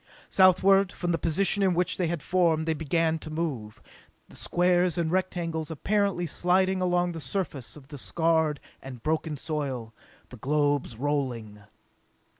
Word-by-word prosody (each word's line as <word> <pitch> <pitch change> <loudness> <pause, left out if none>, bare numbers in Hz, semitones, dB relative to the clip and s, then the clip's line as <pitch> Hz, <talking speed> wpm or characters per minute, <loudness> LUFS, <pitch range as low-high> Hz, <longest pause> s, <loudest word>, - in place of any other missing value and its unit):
Southward 190 0 +5
from 175 -1 -3
the 165 - 0
position 195 +5 +1
in 190 -3 +3
which 180 +1 0
they 180 - 0
had 165 -3 -3
formed 165 -3 +2
they 160 - +2
began 160 +1 0
to 155 - -9
move, 150 -10 -4 0.5
the - - -14
squares 180 -1 +2
and 165 -2 0
rectangles 170 -4 -2
apparently 195 +2 0
sliding 185 +3 +1
along 180 -1 +1
the 165 -1 -6
surface 145 - -4
of 140 -1 -16
the 145 - -8
scarred 160 -1 +1 0.2
and 130 -3 -10
broken 155 -1 -1
soil, 135 -7 -4 0.4
the 125 - -11
globes 145 -1 0
rolling. 125 -7 -2
165 Hz, 150 wpm, -27 LUFS, 145-180 Hz, 0.5 s, Southward